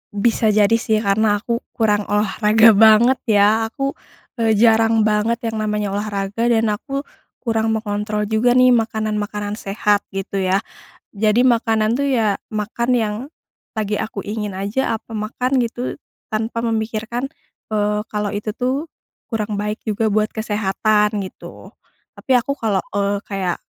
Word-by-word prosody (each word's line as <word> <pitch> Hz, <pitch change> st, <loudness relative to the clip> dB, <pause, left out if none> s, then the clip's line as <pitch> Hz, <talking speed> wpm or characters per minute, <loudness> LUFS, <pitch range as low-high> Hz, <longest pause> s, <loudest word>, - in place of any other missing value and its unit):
Bisa 225 Hz, +2 st, +2 dB
jadi 210 Hz, -1 st, +3 dB
sih 220 Hz, -1 st, 0 dB
karena 205 Hz, +1 st, +2 dB
aku 235 Hz, +3 st, -2 dB, 0.2 s
kurang 210 Hz, -3 st, +1 dB
olahraga 215 Hz, +2 st, +4 dB
banget 220 Hz, +4 st, +6 dB
ya 215 Hz, +1 st, +4 dB
aku, 275 Hz, +4 st, -3 dB, 0.5 s
eee, 225 Hz, -1 st, +3 dB
jarang 225 Hz, 0 st, +4 dB
banget 215 Hz, +2 st, +1 dB, 0.2 s
yang 220 Hz, -, -4 dB
namanya 210 Hz, -1 st, -1 dB
olahraga, 205 Hz, +2 st, -2 dB
dan 225 Hz, -2 st, +2 dB
aku 275 Hz, +6 st, -4 dB, 0.4 s
kurang 225 Hz, -1 st, 0 dB
mengontrol 210 Hz, 0 st, -2 dB
juga 220 Hz, +4 st, +2 dB
nih 255 Hz, 0 st, +6 dB
makanan-makanan 210 Hz, -2 st, -1 dB
sehat 205 Hz, +1 st, 0 dB
gitu 195 Hz, 0 st, -3 dB
ya, 190 Hz, +1 st, +1 dB, 0.5 s
jadi 215 Hz, +4 st, +3 dB
makanan 225 Hz, -2 st, +2 dB
tuh 280 Hz, +3 st, 0 dB
ya, 220 Hz, -6 st, +2 dB, 0.2 s
makan 215 Hz, +3 st, -2 dB
yang 215 Hz, -2 st, -1 dB, 0.6 s
lagi 210 Hz, -1 st, -1 dB
aku 205 Hz, -1 st, -4 dB
ingin 210 Hz, -2 st, -4 dB
aja, 205 Hz, +6 st, -1 dB
aku 225 Hz, -, -12 dB
makan 250 Hz, +5 st, 0 dB
gitu 240 Hz, +2 st, -3 dB, 0.3 s
tanpa 225 Hz, +1 st, -2 dB
memikirkan, 225 Hz, +3 st, -2 dB, 0.4 s
eee, 210 Hz, -1 st, 0 dB
kalau 210 Hz, -1 st, -2 dB
itu 210 Hz, +1 st, -3 dB
tuh 270 Hz, +6 st, -1 dB, 0.4 s
kurang 215 Hz, -2 st, -2 dB
baik 210 Hz, +2 st, -2 dB
juga 220 Hz, +1 st, 0 dB
buat 215 Hz, +1 st, +1 dB
kesehatan 210 Hz, 0 st, +1 dB
gitu. -, -, -12 dB, 0.5 s
Tapi 265 Hz, -, -1 dB
aku 280 Hz, +3 st, +1 dB
kalau, 205 Hz, -4 st, 0 dB
eee, 200 Hz, 0 st, -1 dB
kayak 190 Hz, -3 st, -3 dB
215 Hz, 140 wpm, -20 LUFS, 210-230 Hz, 0.6 s, banget